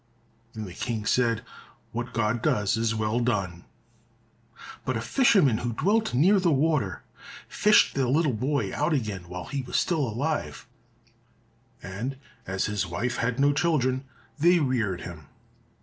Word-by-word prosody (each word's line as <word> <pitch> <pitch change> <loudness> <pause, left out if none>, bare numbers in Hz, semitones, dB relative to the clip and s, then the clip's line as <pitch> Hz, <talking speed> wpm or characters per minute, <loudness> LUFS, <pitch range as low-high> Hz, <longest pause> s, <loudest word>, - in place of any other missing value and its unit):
Then 110 -1 -6
the 90 - -9
King 110 +1 -3
said, 115 -1 +1 0.5
"What 120 +1 -4
God 115 0 0
does, 105 -1 +1
is 115 0 0
well 110 +2 0
done!" 95 -8 -1 1.2
But 130 -3 -1
a - - -2
fisherman 145 - +3
who 120 -1 -3
dwelt 205 - +1
near 190 +10 +5
the 180 -3 +2
water 140 - +1 0.4
fished 210 0 +4
the 135 -2 0
little 145 +1 +2
boy 125 -2 -1
out 150 +3 0
again 105 - -3
while 90 0 -6
he 140 -2 -3
was 125 - -2
still 170 -4 +1
alive, 140 +7 -3 1.2
and 115 +9 -5 0.3
as 95 0 -1
his 105 -3 -1
wife 110 +9 -2
had 120 +1 -1
no 140 +1 +4
children, 140 -5 +1 0.3
they 175 +4 +5
reared 115 - 0
him. 80 -3 -9
120 Hz, 150 wpm, -26 LUFS, 105-145 Hz, 1.2 s, near